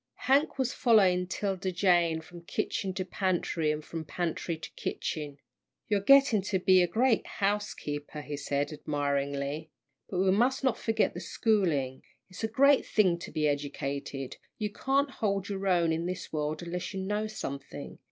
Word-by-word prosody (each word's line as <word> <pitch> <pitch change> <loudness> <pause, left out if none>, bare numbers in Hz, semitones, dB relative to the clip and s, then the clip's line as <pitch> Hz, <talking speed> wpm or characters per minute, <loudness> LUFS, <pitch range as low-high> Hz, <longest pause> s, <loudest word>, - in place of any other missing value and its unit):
Hank 275 +2 +2
was 260 -2 0
following 190 -6 +4
'Tilda 190 0 -2
Jane 175 -3 +3
from 175 +1 -12
kitchen 190 +2 -2
to 185 - -2
pantry, 175 -4 0
and 150 0 -4
from 165 -1 -5
pantry 165 +1 -3
to 160 - -9
kitchen. 145 -3 -4 0.5
"You're 205 -1 +3
getting 270 -2 +6
to 195 0 0
be 185 0 +5
a 175 - +3
great 235 +3 +2
housekeeper," 165 -8 -2
he 150 - -5
said, 145 +1 -2
admiringly; 140 +1 -2 0.4
"but 185 - -3
we 190 +1 +3
must 250 +7 +2
not 260 -3 +1
forget 225 -1 +1
the - - -5
schooling. 160 - 0 0.3
It's 185 - -8
a - - +2
great 275 +5 +5
thing 185 -5 +2
to - - -8
be 150 -1 +1
educated. 140 -2 -3 0.2
You 210 -1 -2
can't 275 +5 +1
hold 200 -5 -1
your 195 -1 -3
own 170 -3 +3
in 165 +2 -1
this 185 -2 -5
world 155 +1 -2
unless 180 +3 -4
you - - -2
know 210 +3 -1
something. 140 -10 -7
180 Hz, 165 wpm, -29 LUFS, 150-210 Hz, 0.5 s, getting